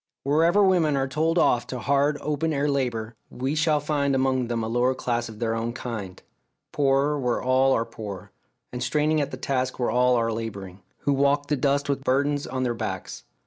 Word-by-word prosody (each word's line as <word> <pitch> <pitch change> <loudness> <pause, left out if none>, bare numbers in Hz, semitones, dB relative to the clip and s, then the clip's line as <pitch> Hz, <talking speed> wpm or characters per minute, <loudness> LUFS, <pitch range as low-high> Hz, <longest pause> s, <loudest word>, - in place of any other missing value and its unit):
Wherever 165 +8 +3
women 170 -7 +3
are 135 0 0
told 160 +5 0
off 120 -7 +3
to 130 - -5
hard 140 +3 +1
open 150 +2 -1
air 145 0 0
labour, 120 -5 -1 0.2
we 130 +3 -3
shall 155 0 +2
find 145 -2 0
among 130 -2 +1
them 115 -1 -2
a - - -2
lower 120 +3 +1
class 120 -2 -2
of 110 - -10
their 115 0 -1
own 115 +1 -2
kind 110 -7 -6 0.5
poorer 140 +1 +2
where 125 -2 0
all 130 +1 +3
are 115 - +1
poor, 105 -6 -8 0.4
and 125 - -4
straining 150 +4 +1
at 140 - -2
their - - -8
task 130 -1 -1
where 120 -3 0
all 125 +1 +3
are 115 -1 +1
labouring 100 -4 -6 0.2
who 145 - +1
walk 140 +1 +1
the 150 - +2
dust 140 +1 +1
with 140 -1 -1
burdens 145 +2 +1
on 130 0 -2
their 120 -2 0
backs. 115 - -5
135 Hz, 200 wpm, -25 LUFS, 120-145 Hz, 0.5 s, Wherever